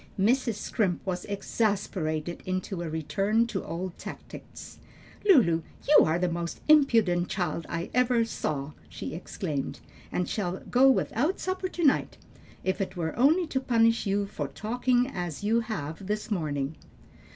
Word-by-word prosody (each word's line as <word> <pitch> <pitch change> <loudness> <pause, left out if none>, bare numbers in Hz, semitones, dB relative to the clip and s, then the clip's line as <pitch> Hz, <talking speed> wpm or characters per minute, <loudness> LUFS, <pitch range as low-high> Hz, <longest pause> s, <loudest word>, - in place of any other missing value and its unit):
Mrs. 235 +2 +2
Scrimp 195 -3 -1
was 180 -2 -3
exasperated 195 -6 -1
into 185 0 -3
a 170 - -3
return 195 +8 +1
to 220 -5 -3
old 180 +1 -5
tactics. - - -10 0.5
"Lulu, 170 - +6 0.3
you 295 - +7
are 160 +2 +1
the 180 +1 +1
most 170 0 -3
impudent 225 -13 +4
child 170 -3 -2
I 165 +1 -3
ever 245 -2 +3
saw!" 145 -9 -3 0.2
she - - -6
exclaimed, 155 -4 -4 0.3
"and 180 - -1
shall 185 -3 -2
go 260 +2 +6
without 275 - +1
supper 370 0 -2
to 355 -2 -4
night, 285 -3 +2 0.5
if 190 +1 0
it 190 -1 -3
were 160 -2 -2
only 310 +9 +4
to 270 -4 -1
punish 230 -3 +2
you 200 +1 +1
for 150 -7 -4
talking 245 - +1
as 175 - -5
you 225 +3 +3
have 190 -6 -5
this 210 +2 -3
morning." 150 -5 -2
195 Hz, 150 wpm, -28 LUFS, 170-235 Hz, 0.5 s, you